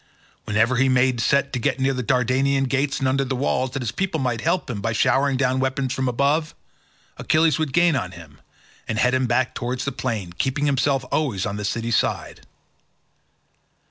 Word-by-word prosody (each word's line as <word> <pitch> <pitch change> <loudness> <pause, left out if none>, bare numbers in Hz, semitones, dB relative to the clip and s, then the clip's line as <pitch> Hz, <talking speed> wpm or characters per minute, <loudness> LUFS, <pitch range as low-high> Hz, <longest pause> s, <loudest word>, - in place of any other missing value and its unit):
Whenever 115 +4 +2
he 135 +1 +3
made 130 -1 +2
a - - 0
set 140 +3 +1
to 125 - -1
get 120 - -1
near 135 +1 +1
the 125 - -2
Dardanian 130 +3 +1
gates 135 +2 0
and 135 - 0
under 135 +1 +1
the 135 0 -3
walls, 130 0 0
that 130 +1 -4
his 115 - -2
people 185 +4 -2
might 120 -4 -1
help 180 - 0
him 110 -6 -4
by 110 +1 -1
showering 135 +4 +2
down 130 -1 +1
weapons 130 0 -1
from 130 0 -1
above, 140 +5 0 0.6
Achilles 155 -2 +2
would 155 -3 -1
gain 170 +1 +3
on 95 -8 -3
him 80 -4 -14 0.5
and 110 - -2
head 125 +3 +2
him 130 -1 +1
back 125 +2 +1
towards 125 +2 -3
the 140 - -1
plain, 115 -9 -4
keeping 135 +9 -1
himself 135 -1 +1
always 120 -12 0
on 100 - -3
the 105 - -5
city 115 +3 -2
side. - - -1
130 Hz, 200 wpm, -22 LUFS, 120-140 Hz, 0.6 s, he